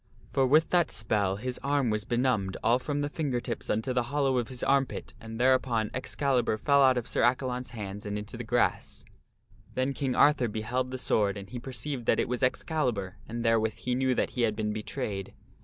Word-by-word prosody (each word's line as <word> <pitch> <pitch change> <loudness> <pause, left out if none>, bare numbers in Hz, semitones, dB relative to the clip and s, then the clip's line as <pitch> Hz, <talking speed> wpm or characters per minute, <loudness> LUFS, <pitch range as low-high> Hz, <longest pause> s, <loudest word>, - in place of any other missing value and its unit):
For 135 -1 +3
with 155 +4 +4
that 175 -2 +3
spell 105 -3 0
his 125 +4 -4
arm 140 -4 +1
was 105 -1 -1
benumbed 120 -6 0
all 120 +2 +4
from 145 +2 -2
the 145 - 0
finger 145 -5 -1
tips 120 -1 -5
unto 110 +4 0
the 125 - +2
hollow 135 -3 +2
of 120 - -2
his 125 -2 -5
armpit, 135 -1 0
and 115 0 -8
thereupon 125 -4 +2
Excalibur 130 -3 0
fell 140 +4 +3
out 130 -2 +5
of 120 - -2
Sir - - 0
Accalon's 125 0 +1
hands 105 -2 -6
and 105 0 -2
into 105 0 -7
the - - -5
grass. - - 0 0.7
Then 130 +2 0
King 135 -3 -2
Arthur 145 -4 +4
beheld 120 +4 -2
the 130 - -4
sword 105 -5 +1
and 100 0 -9
he 125 - -5
perceived 130 0 -5
that - - +3
it - - +1
was 125 +1 -2
Ex 130 -1 +1
calibur 120 - -2
and 120 +1 -4
therewith 110 -1 +2
he 125 - -3
knew 130 0 +1
that - - 0
he 125 - -2
had 110 -2 +2
been 105 -1 -1
betrayed. 105 -2 -4
125 Hz, 210 wpm, -29 LUFS, 110-130 Hz, 0.7 s, out